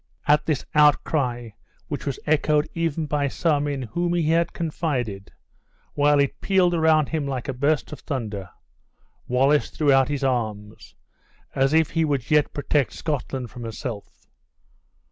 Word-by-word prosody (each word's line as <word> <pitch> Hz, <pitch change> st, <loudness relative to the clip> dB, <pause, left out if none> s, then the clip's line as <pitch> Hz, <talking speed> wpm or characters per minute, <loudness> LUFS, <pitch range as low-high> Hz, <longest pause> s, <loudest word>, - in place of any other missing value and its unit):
At 150 Hz, +1 st, +3 dB
this 150 Hz, -5 st, -1 dB
outcry, 140 Hz, -5 st, +2 dB, 0.4 s
which 145 Hz, -1 st, -5 dB
was 140 Hz, -, -2 dB
echoed 150 Hz, 0 st, +2 dB
even 165 Hz, -2 st, -1 dB
by 145 Hz, -1 st, 0 dB
some 145 Hz, 0 st, 0 dB
in 140 Hz, -2 st, -3 dB
whom 175 Hz, +9 st, -1 dB
he 165 Hz, -3 st, +1 dB
had 170 Hz, +1 st, +2 dB
confided, 130 Hz, -, -3 dB, 0.6 s
while 145 Hz, 0 st, +3 dB
it 140 Hz, -1 st, 0 dB
pealed 185 Hz, -3 st, +3 dB
around 160 Hz, -3 st, +3 dB
him 155 Hz, -3 st, -2 dB
like 130 Hz, -3 st, -4 dB
a 135 Hz, -, -2 dB
burst 145 Hz, +4 st, 0 dB
of 150 Hz, -, -7 dB
thunder, 105 Hz, -9 st, -5 dB, 0.8 s
Wallace 135 Hz, +4 st, +2 dB
threw 145 Hz, -3 st, +2 dB
out 135 Hz, -1 st, +4 dB
his 145 Hz, -1 st, -2 dB
arms, 110 Hz, -5 st, -3 dB, 0.6 s
as 135 Hz, +1 st, +2 dB
if 160 Hz, -1 st, +3 dB
he 165 Hz, -, +1 dB
would 140 Hz, -5 st, -1 dB
yet 150 Hz, -1 st, +3 dB
protect 145 Hz, -1 st, 0 dB
Scotland 135 Hz, -5 st, -4 dB
from 125 Hz, -1 st, -9 dB
herself. 115 Hz, -1 st, -7 dB
145 Hz, 150 wpm, -24 LUFS, 130-155 Hz, 0.8 s, out